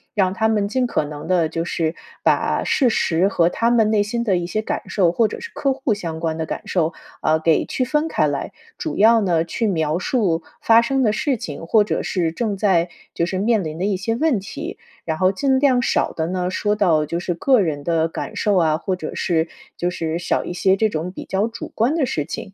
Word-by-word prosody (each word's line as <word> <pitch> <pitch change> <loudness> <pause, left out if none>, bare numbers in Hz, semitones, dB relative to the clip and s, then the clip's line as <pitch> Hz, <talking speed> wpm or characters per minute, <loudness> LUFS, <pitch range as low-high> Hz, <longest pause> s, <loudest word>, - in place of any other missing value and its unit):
让 190 -3 +2
他 220 +2 +1
们 210 -2 +1
尽 250 +3 +1
可 240 - 0
能 145 0 -8
地 175 -4 +2
就 165 +1 -3
是 165 -2 -1 0.3
把 - - +2
事 265 -5 +2
实 180 -4 +2
和 175 -4 +2
他 230 +6 +1
们 225 -3 +3
内 215 -2 +3
心 235 +3 -2
的 195 -6 +2
一 175 0 -3
些 215 +4 -1
感 - - -3
受， 180 -5 +2
或 220 +5 +2
者 - - -7
是 465 - -8
客 275 -1 0
户 265 -3 -1
相 165 -5 -5
关 160 -1 -1
的 160 - -2
感 - - -5
受， 165 -2 0 0.3
啊， 155 - +3
给 160 0 +2
区 255 - -1
分 300 +5 0
开 - - +1
来。 - - -3 0.2
主 315 - -4
要 225 +2 +6
呢 170 -5 +2
去 220 +7 -2
描 160 -4 0
述 185 -7 0 0.2
发 230 0 +6
生 265 +2 0
的 215 - +3
事 265 +5 0
情， 165 -7 -7
或 210 +5 +4
者 205 - -2
是 170 -4 -1
正 215 +2 -2
在 185 -4 +2 0.3
就 170 - 0
是 185 +2 -3
面 215 +2 +2
临 155 0 -5
的 175 - -3
一 200 -1 +1
些 225 +4 -1
问 290 -3 +1
题。 190 - -7 0.3
然 160 -1 -2
后 185 +2 +3
尽 265 +5 +2
量 260 -3 +3
少 - - 0
地 160 - -2
呢， 180 0 -1
说 205 +3 0
到 165 -7 +3
就 170 +3 -3
是 175 0 -2
个 255 +9 +3
人 155 -7 -1
的 165 0 +1
感 165 - -6
受 210 -2 +1
啊， 160 -4 +3
或 185 +3 -2
者 160 -4 -6
是 165 -4 0 0.3
就 175 - 0
是 165 -2 -3
少 175 - -1
一 - - -4
些 190 +2 +2
这 220 - +3
种 175 -3 -3
比 - - -8
较 195 +2 0
主 230 - -8
观 235 +6 +2
的 320 -4 +1
事 155 -11 -2
情。 195 +5 -7
190 Hz, 260 characters per minute, -21 LUFS, 165-225 Hz, 0.3 s, 要